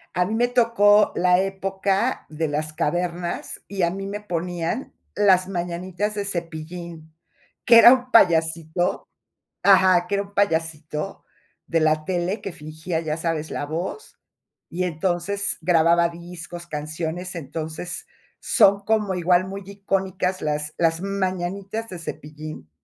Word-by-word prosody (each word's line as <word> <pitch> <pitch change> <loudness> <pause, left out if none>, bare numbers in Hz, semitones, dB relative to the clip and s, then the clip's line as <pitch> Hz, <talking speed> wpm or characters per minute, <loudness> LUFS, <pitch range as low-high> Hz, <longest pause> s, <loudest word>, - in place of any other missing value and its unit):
A 180 - +2
mí 215 - -2
me 240 +2 +2
tocó 220 -4 +4
la 180 0 +4
época 195 +4 -1
de 155 0 -2
las 155 +1 -2
cavernas, 175 +3 -2
y 195 -2 -2
a 170 - +2
mí 195 +1 -5
me 205 +1 -4
ponían 175 +3 -3 0.2
Las 190 -3 +4
mañanitas 180 +3 -3
de 205 -1 -2
Cepillín, 165 -2 -6 0.5
que 235 -1 +8
era 240 +2 +10
un 255 -1 -2
payasito 165 -3 +2 0.6
ajá, 185 -2 +5
que 200 - 0
era 200 - -1
un 200 0 -18
payasito 160 -3 -1 0.4
de 165 -1 +1
la 155 0 +2
tele, 185 +3 -1
que 195 - -5
fingía, 160 +1 -4
ya 155 -2 -2
sabes, 160 -1 -2
la - - -3
voz, 170 - -5 0.5
y 180 +2 -2
entonces 180 +4 -1
grababa 170 0 +4
discos, 170 0 -9
canciones. 160 +3 -4
Entonces 160 +3 -5 0.3
son 200 -4 +4
como 210 -2 +1
igual, 180 +1 +2
muy 195 +1 -6
icónicas 190 -2 -2
Las 150 0 -2
Las 165 0 +1
mañanitas 195 +2 -3
de 180 - -7
Cepillín. 155 - -8
180 Hz, 135 wpm, -23 LUFS, 160-195 Hz, 0.6 s, era